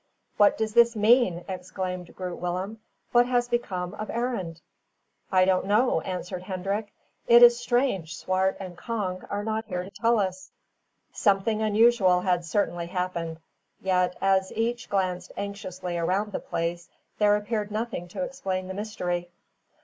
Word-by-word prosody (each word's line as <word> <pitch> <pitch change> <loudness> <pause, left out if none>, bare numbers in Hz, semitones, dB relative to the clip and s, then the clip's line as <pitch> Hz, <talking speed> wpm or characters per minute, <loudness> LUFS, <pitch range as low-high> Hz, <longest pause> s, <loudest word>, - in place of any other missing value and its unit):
"What 205 - +5
does 220 -1 -1
this 235 0 +5
mean?" 210 -5 +3
exclaimed 185 -1 -5
Groot 180 -2 -5
Willem. 185 +5 -3 0.3
"What 240 0 +5
has 245 -1 +1
become 190 -7 -2
of 215 0 -6
Arend?" 225 -9 -2 0.7
"I 185 -1 +5
don't 190 0 +2
know," 210 -3 +3
answered 180 0 -5
Hendrik. 195 +3 -3 0.4
"It 235 +1 +8
is 240 0 +8
strange 240 - 0
Swart 190 +1 0
and 185 -2 -7
Cong 190 -3 -3
are 205 0 -2
not 220 +1 -2
here 180 -4 -3
to 190 - -10
tell 230 +4 +2
us." 185 -1 -2 0.6
Something 210 +1 +2
unusual 215 -4 +4
had 180 -2 +1
certainly 175 -1 -1
happened; 170 -3 -3 0.4
yet, 180 -1 +1
as 190 0 +2
each 235 +2 -1
glanced 185 -2 -1
anxiously 185 -3 -4
around 195 +5 0
the - - -3
place, 170 +1 -3 0.3
there 210 -1 +5
appeared 210 0 -2
nothing 215 -4 -3
to 225 +10 -4
explain 195 -9 -3
the - - -4
mystery. 180 -4 -3
195 Hz, 150 wpm, -26 LUFS, 180-220 Hz, 0.7 s, It